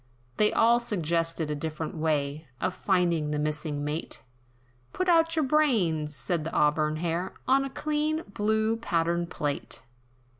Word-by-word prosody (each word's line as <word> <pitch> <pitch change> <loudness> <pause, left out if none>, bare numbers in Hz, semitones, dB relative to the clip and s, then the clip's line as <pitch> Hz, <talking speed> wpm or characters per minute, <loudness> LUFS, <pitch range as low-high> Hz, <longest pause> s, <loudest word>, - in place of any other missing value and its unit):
They 210 - +4
all 235 +1 +4
suggested, 165 -7 -1
a - - -1
different 155 +2 -4
way, 155 -1 -1
Of 185 0 -1
finding 175 -6 +1
the 150 - -1
missing 150 0 -2
Mate, 150 +3 -3 0.7
"Put 370 - -1
out 330 -1 +4
your 315 -3 +2
brains," 195 - +2
said 150 +6 -2
the 165 - -4
auburn 150 +1 +2
hair, 170 +3 -2
"On 270 +1 +4
a 275 - -3
clean, 305 +3 -1
blue 220 +2 +1
pattern 170 -4 0
plate. 145 -7 -4
170 Hz, 145 wpm, -28 LUFS, 150-225 Hz, 0.7 s, They